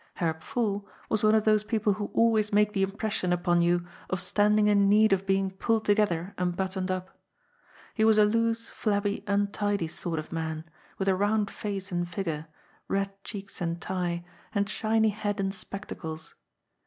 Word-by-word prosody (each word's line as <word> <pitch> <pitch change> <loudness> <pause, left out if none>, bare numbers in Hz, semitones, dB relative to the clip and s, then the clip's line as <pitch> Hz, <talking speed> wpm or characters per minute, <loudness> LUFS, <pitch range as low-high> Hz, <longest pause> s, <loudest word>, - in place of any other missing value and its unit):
Herr 165 -2 0
Pfuhl 205 +5 -2 0.3
was 220 -1 0
one 215 0 +5
of 215 - +3
those 215 -1 +3
people 210 -1 +1
who 205 +1 -4
always 220 -2 +3
make 210 0 +3
the 195 - 0
impression 195 -1 -1
upon 175 0 +2
you 175 0 +2 0.2
of 190 - -1
standing 210 +3 +3
in 200 -1 +4
need 215 0 +5
of 195 0 0
being 195 0 +2
pulled 220 +3 0
together 205 -4 +1
and 180 -1 0
buttoned 190 0 -2
up. 185 0 -3 0.8
He 220 - +1
was 220 -1 +5
a 210 - +7
loose, 230 +1 +1
flabby, 205 -1 -1
untidy 200 -2 0
sort 165 +1 -4
of 155 - -5
man, 160 -1 -3 0.3
with 195 - -2
a 190 - +5
round 205 +2 +1
face 200 -1 -4
and 175 0 -1
figure, 165 -4 -3 0.4
red 195 0 0
cheeks 200 -2 -7
and 170 0 -1
tie, 175 -1 -2 0.3
and 200 0 +2
shiny 220 +1 +2
head 205 -1 -2
and 195 0 0
spectacles. 180 -5 -7
200 Hz, 175 wpm, -28 LUFS, 180-210 Hz, 0.8 s, a